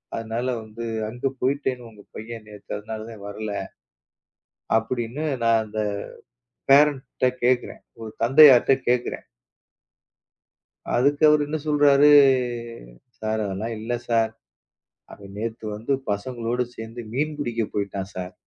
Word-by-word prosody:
அதனால 115 +2 -3 0.2
வந்து 110 +2 -8 0.2
அங்க 120 +4 -3
போயிட்டேன்னு 130 -3 -1
உங்க 105 -2 -16
பையன் 110 -1 -8
நேத்து 105 -1 -14
அதனால 110 +1 -7 0.2
வரல, 105 +1 -5 1.3
அப்படின்னு 120 +5 -4 0.2
நான் 115 -1 +4
அந்தப் 105 -1 -3 0.7
பேரண்ட்ட 140 -3 +4 0.2
கேக்குறேன். 125 0 0 0.2
ஒரு 110 -1 -7
தந்தையார்ட்ட 135 0 +7 0.2
கேக்குறேன். 125 0 -1 1.7
அதுக்கு 145 +4 +2
அவரு 150 0 +4
என்ன 155 +1 -2
சொல்றாரு? 145 -1 +5 1.1
சார் 110 0 -1
அதெல்லாம் 105 +4 -4
இல்ல 110 +3 -4 0.2
சார். 115 -1 +2 0.8
அவன் 100 -1 -12
நேத்து 110 +1 -5
வந்து 110 +6 -5 0.2
பசங்களோட 120 +3 -2
சேர்ந்து 115 +2 -8
மீன் 150 +3 -1
பிடிக்கப் 115 -5 -3
போயிட்டான் 100 -1 -3
சார். 90 -1 -6
115 Hz, 110 wpm, -24 LUFS, 110-130 Hz, 1.7 s, தந்தையார்ட்ட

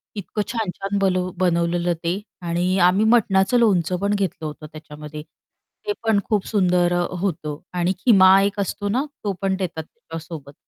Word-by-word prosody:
इतकं 210 +1 -4
छान-छान 200 -3 -3
बलू 185 -2 +1
बनवलेलं 175 -1 +1
ते 170 +3 -1 0.2
आणि 175 +2 0
आम्ही 190 +4 +3
मटणाचं 220 -1 +3
लोणचं 185 -6 +2
पण 200 +2 0
घेतलं 190 -5 -2
होतं 155 0 -7
त्याच्यामध्ये, 150 -1 -9
ते 415 - -10
पण 220 -3 +3
खूप 210 -3 +1
सुंदर 180 -4 +2
अ, 175 - 0 0.2
होतं 155 -6 -3 0.2
आणि 175 +2 +1
खिमा 190 -4 +6
एक 200 +1 -1
असतो 200 +1 -2
ना, 255 +7 0 0.2
तो 205 -2 -1
पण 195 -1 +1
देतात 170 -4 -4
त्याच्यासोबत. 160 -2 -10
185 Hz, 155 wpm, -22 LUFS, 170-200 Hz, 0.2 s, खिमा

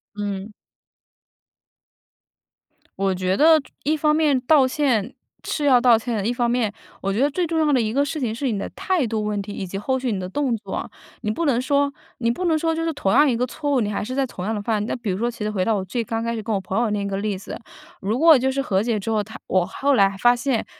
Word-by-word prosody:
嗯。 205 0 -4 2.5
我 195 -1 +1
觉 185 +1 -1
得， 315 0 +6 0.2
一 310 +2 +1
方 300 0 +2
面 300 -4 +3
道 275 0 +4
歉 255 -7 0 0.3
是 300 - -2
要 260 -3 +6
道 240 -2 +5
歉 235 0 -3
的， 200 - -2
一 240 - +1
方 240 -1 0
面， 235 -4 0 0.3
我 195 0 -2
觉 210 - -1
得 285 - +4
最 350 +4 -1
重 325 0 -1
要 300 -2 +3
的 265 - +3
一 220 -2 -1
个 280 +3 +3
事 295 +2 -3
情 235 -5 -1
是 255 +2 -2
你 210 - -2
的 200 - -3
态 365 -7 -1
度 220 -2 -2
问 210 -1 -1
题 200 +1 -6
以 190 - -5
及 195 - -5
后 260 +6 -1
续 250 -3 -2
你 200 - -2
的 180 - -4
动 255 +3 -1
作。 220 - -5 0.3
你 215 - -2
不 325 +10 -1
能 250 -4 +2
说 280 +1 +1 0.2
你 230 -1 +1
不 360 +9 -3
能 320 -2 +3
说 325 +1 0
就 330 0 -2
是 330 - 0
同 200 -10 -1
样 295 +5 +5
一 235 - +1
个 250 - +1
错 290 +3 -4
误， 265 - +3
你 210 -1 -1
还 200 - -2
是 255 +5 -5
在 275 0 +1
同 195 -7 -8
样 220 - -1
地 210 - -2
犯。 215 -2 0
那 - - -2
比 230 -6 -3
如 185 - -2
说 235 +2 0
其 235 -3 -6
实 210 - -1
回 195 -3 0
到 220 +3 +1
我 190 -2 -2
最 230 +6 -2
刚 225 +1 -3
开 230 0 -1
始 225 - -3
跟 220 +1 -3
我 195 - 0
朋 190 +3 -2
友 235 -2 +1
那 210 -1 -1
一 - - -3
个 195 -1 -2
例 200 -1 -2
子， 195 - -8 0.5
如 210 +5 -1
果 320 +2 +7
就 265 +1 +1
是 275 +1 -1
和 190 -6 +1
解 225 -1 0
之 225 +3 -3
后， 210 -1 +1
她 220 - -11
我 185 -1 +2
后 280 +10 0
来 195 -5 +3
发 240 +2 +5
现， 245 -2 -1
235 Hz, 295 characters per minute, -22 LUFS, 205-280 Hz, 2.5 s, 果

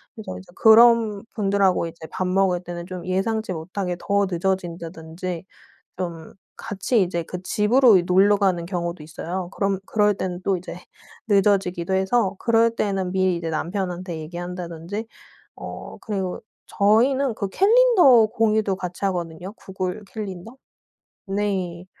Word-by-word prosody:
그래서 220 - -7
이제 180 -1 -13
그런 225 -2 +5
분들하고 195 -5 +2
이제 165 0 -10
밥 185 - -2
먹을 185 -1 +2
때는 175 -1 -6
좀 180 -1 -7
예상치 195 +3 -1
못하게 180 +2 -4
더 200 +2 +1
늦어진다든지 175 -1 -4 0.5
좀 170 -3 -6 0.2
같이 220 +1 0
이제 170 -2 -1
그 180 +2 -7
집으로 220 +3 +4
이 175 - +1
놀러 195 +3 +4
가는 185 -4 +1
경우도 170 -3 -4
있어요. 175 +3 -5
그럼 195 -1 -1
그럴 210 0 +2
때는 185 -2 -4
또 195 - +1
이제 175 0 -8 0.5
늦어지기도 195 -3 +2
해서 190 +1 +1
그럴 230 0 +3
때는 195 -4 -1
미리 185 -2 +1
이제 165 -1 -4
남편한테 175 +1 -3
얘기한다든지. 175 +4 -6 0.5
어 - - -8
그리고 190 -4 -3 0.3
저희는 240 +5 +2
그 200 -3 -3
캘린더 390 - +6
공유도 215 -2 +1
같이 180 +1 -6
하거든요, 175 0 -4
구글 190 0 -5
캘린더. 210 +2 -7 0.7
네 190 -3 -2
190 Hz, 305 characters per minute, -23 LUFS, 175-210 Hz, 0.7 s, 캘린더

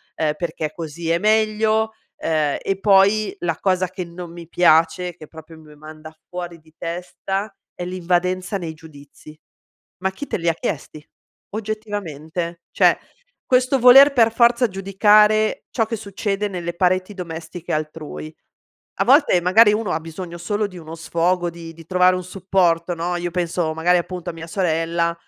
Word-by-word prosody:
uhm, 155 -1 0
perché 155 -3 -3
così 165 0 -6
è 170 - +2
meglio." 220 +1 +2 0.3
Uhm, 155 -3 0
e 195 0 -2
poi 200 +1 +4
la 165 -2 -2
cosa 185 -2 +1
che 185 0 -5
non 170 0 -9
mi 170 -1 -10
piace, 170 +1 +3
che 155 -3 -12
proprio 160 0 -13
mi 150 -1 -16
manda 155 +1 -12
fuori 175 -2 -6
di 160 0 -24
testa 190 +4 -4 0.2
è 175 - -5
l'invadenza 180 +2 -1
nei 165 -3 -6
giudizi, 155 0 -15 0.6
ma 190 0 0
chi 285 +8 -8
te - - -2
li 170 -1 -1
chiesti, 155 - -5 0.5
oggettivamente. 180 -6 -5
Cioè - - +4 0.5
questo 255 +1 +2
voler 270 +3 +9
per 230 -4 +4
forza 235 +1 +4
giudicare 210 +3 +3
ciò 225 - +1
che 225 +1 -4
succede 200 0 -3
nelle 175 -2 -5
pareti 185 +2 +1
domestiche 170 -1 -7
altrui. 155 0 -5 0.7
A - - +2
volte 280 - +5
magari 210 +4 +6
uno 215 -4 -2
ha 160 - -1
bisogno 170 +2 -8
solo 205 +4 -1
di 185 -3 -11
uno 160 -1 -9
sfogo 170 +2 0
di 165 -1 -10
di 165 0 -14
trovare 180 +1 +3
un 180 - -5
supporto 180 -2 0
no, 175 +1 -2
io 175 0 -3
penso 170 -2 -1
magari 175 +2 +3
appunto 180 0 -5
a - - -6
mia 165 0 -9
sorella, 170 -1 0
180 Hz, 160 wpm, -21 LUFS, 165-200 Hz, 0.7 s, voler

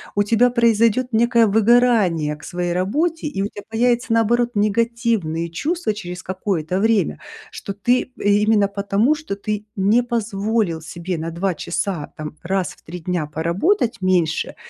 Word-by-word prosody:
у 205 - +3
тебя 230 +4 +3
произойдет 235 +1 +2
некое 235 +1 +4
выгорание 210 -8 +3
к 150 - -17
своей 175 -1 -3
работе? 300 - -1
И 195 -10 -2
у - - 0
тебя 205 -1 -10
появятся 240 +1 +1
наоборот 235 +2 +2
негативные 210 -6 0
чувства 300 - -1
через 180 -3 -7
какое-то 185 -2 -2
время, 220 0 +1 0.3
что 200 - -6
ты, 245 +6 0
именно 205 0 +3
потому, 200 +6 +1
что 305 -9 -5
ты 210 +1 -4
не 205 +4 +3
позволил 215 -6 -1
себе 170 +3 -5
на 165 +1 -3
2 180 +3 -1
часа, 170 -1 -3
там 155 0 -7
раз 190 +1 -1
в - - -24
3 175 +3 -8
дня 170 -2 -2
поработать 180 - 0
меньше 180 -4 +1
205 Hz, 150 wpm, -20 LUFS, 180-235 Hz, 0.3 s, некое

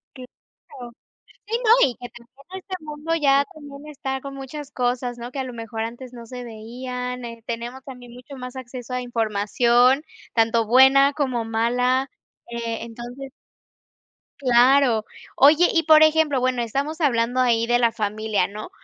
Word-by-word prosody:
Claro, 250 -1 -14 0.6
sí, 455 +2 -1
no, 440 - +5 0.2
y 245 - -5
que 245 +1 -9
también 275 +11 -13
este 375 - -3
mundo 305 +2 -3
ya 280 -3 +3
también 290 -1 -12
está 265 -3 -5
con 275 0 -8
muchas 275 +2 -8
cosas, 245 -1 -2
¿no?, 240 +1 -8
que 275 - -6
a - - -1
lo 255 -1 -7
mejor 225 -1 -6
antes 240 +3 -7
no 235 -1 -10
se 250 +1 -8
veían. 250 +2 -6
Eh, 230 -1 -9
tenemos 240 +3 -6
también 250 -3 -11
mucho 250 +3 -12
más 250 0 -8
acceso 250 -1 -8
a 250 - -1
información, 240 +3 +2 0.3
tanto 230 0 +2
buena 265 +4 +6
como 255 -5 -2
mala, 250 +4 0 0.4
eh, 230 -1 -4
entonces 240 +4 -9 1.1
Claro. 250 -2 +4 0.3
Oye, 310 +6 +6
y 330 - +2
por 310 0 +7
ejemplo, 310 -3 +3
bueno, 250 -1 0
estamos 280 +8 -3
hablando 245 -4 +1
ahí 230 -2 +2
de 240 +1 +2
la 235 -1 +2
familia, 215 -1 -1
¿no?, 210 - -8
250 Hz, 160 wpm, -22 LUFS, 235-275 Hz, 1.1 s, por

